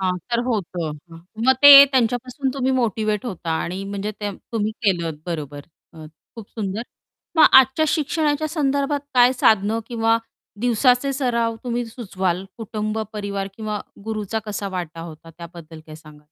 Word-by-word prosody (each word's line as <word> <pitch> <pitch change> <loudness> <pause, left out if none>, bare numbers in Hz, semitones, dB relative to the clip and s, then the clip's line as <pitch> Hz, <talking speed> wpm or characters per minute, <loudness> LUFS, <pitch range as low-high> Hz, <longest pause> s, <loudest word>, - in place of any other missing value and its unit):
हां, 185 -1 0
तर 235 - +1
होतं. 175 -9 -3 0.5
मग 260 - +7
ते 285 - +10 0.2
त्यांच्यापासून 250 +2 0
तुम्ही 265 -1 0
मोटिव्हेट 215 -2 -1
होता 180 -6 -5
आणि 185 +3 -5
म्हणजे 200 +1 -4
ते 205 -1 -2 0.2
तुम्ही 215 -1 -1
केलत 170 -7 0
बरोबर 150 -4 -5 0.3
अ, 160 -1 -11 0.3
खूप 220 -3 -10
सुंदर 210 0 -4 0.5
मग 315 - +7
आजच्या 265 +4 +6
शिक्षणाच्या 300 0 0
संदर्भात 285 -2 0
काय 250 0 +6
साधनं 220 -3 +2
किंवा 225 -1 +1 0.4
दिवसाचे 245 +3 +2
सराव 235 -4 -1
तुम्ही 245 0 -2
सुचवाल 190 -6 -3
कुटुंब 215 0 -4
परिवार 200 -2 -4
किंवा 215 -2 -4 0.2
गुरूचा 220 -1 -3
कसा 205 -1 -4
वाटा 165 -2 -6
होता 165 0 -11
त्याबद्दल 170 -2 -11
काय 155 - -11
सांगाल? 150 -1 -15
215 Hz, 145 wpm, -21 LUFS, 185-245 Hz, 0.5 s, ते